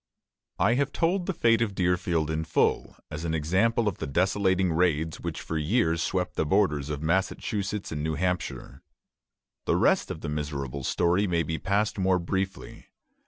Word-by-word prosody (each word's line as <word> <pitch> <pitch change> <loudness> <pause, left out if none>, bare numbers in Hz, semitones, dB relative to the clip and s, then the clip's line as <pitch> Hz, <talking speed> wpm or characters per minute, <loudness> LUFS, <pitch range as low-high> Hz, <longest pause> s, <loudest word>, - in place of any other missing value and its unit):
I 115 - +3
have 140 +2 0
told 175 +3 0
the 190 - 0
fate 115 -1 +3
of 105 -4 -1
Deerfield 90 -3 0
in 80 0 -1
full, 80 - 0 0.2
as 75 +2 -5
an 80 -1 -1
example 95 +9 +1
of 100 - -2
the 80 - -3
desolating 95 +3 +1
raids 80 -2 +1
which - - -4
for 80 - -3
years 85 0 +1
swept 90 +1 -2
the - - +2
borders 75 -5 +1
of 75 0 -4
Massachusetts 95 +4 -1
and 75 -1 -3
New 80 0 -1
Hampshire. 90 +2 -3 0.8
The - - +2
rest - - +2
of 80 - -6
the - - -5
miserable 70 -3 -4
story 90 +8 +1
may 85 -2 +1
be 80 +1 -3
passed 100 +2 0
more 95 -1 +3
briefly. 95 +2 -4
90 Hz, 170 wpm, -27 LUFS, 80-100 Hz, 0.8 s, I